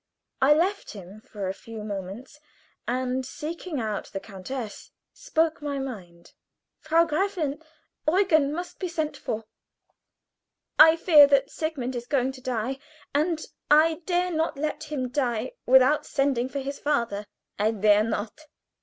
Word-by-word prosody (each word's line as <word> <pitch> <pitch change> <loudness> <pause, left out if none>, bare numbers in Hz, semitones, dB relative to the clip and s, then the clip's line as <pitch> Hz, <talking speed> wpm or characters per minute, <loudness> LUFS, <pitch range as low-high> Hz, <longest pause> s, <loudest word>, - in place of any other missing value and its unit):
I 285 +3 +6
left 380 +6 0
him 200 +1 -11
for 205 -3 -6
a 190 - -2
few 220 +1 -9
moments, 205 +7 -7 0.5
and 255 +1 -1
seeking 315 +3 -5
out 215 -3 -3
the 195 - -5
countess, 215 +4 -7 0.2
spoke 330 -10 0
my 290 -1 -3
mind. 185 -11 -8 0.5
"Frau 325 +2 +3
Gräfin, 320 -4 -1 0.5
Eugen 315 -5 +3
must 350 +3 -6
be 370 - -2
sent 315 -3 -2
for. 225 -5 -4 1.4
I 320 +1 +9
fear 315 -4 +7
that 275 -1 +2
Sigmund 275 -6 -3
is 240 0 -5
going 265 -2 +1
to 260 -1 -12
die, 255 +1 -2 0.3
and 310 +2 0 0.2
I 315 +3 +5
dare 360 0 +1
not 320 -2 -1
let 305 +1 -3
him 290 -4 -3
die 250 -3 -1 0.2
without 265 +3 +5
sending 270 -3 0
for 280 - -5
his 275 +1 -5
father." 235 -8 -1 0.3
"I 210 +1 +3
dare 210 -1 +4
not!" 225 +7 -4
275 Hz, 145 wpm, -26 LUFS, 230-315 Hz, 1.4 s, I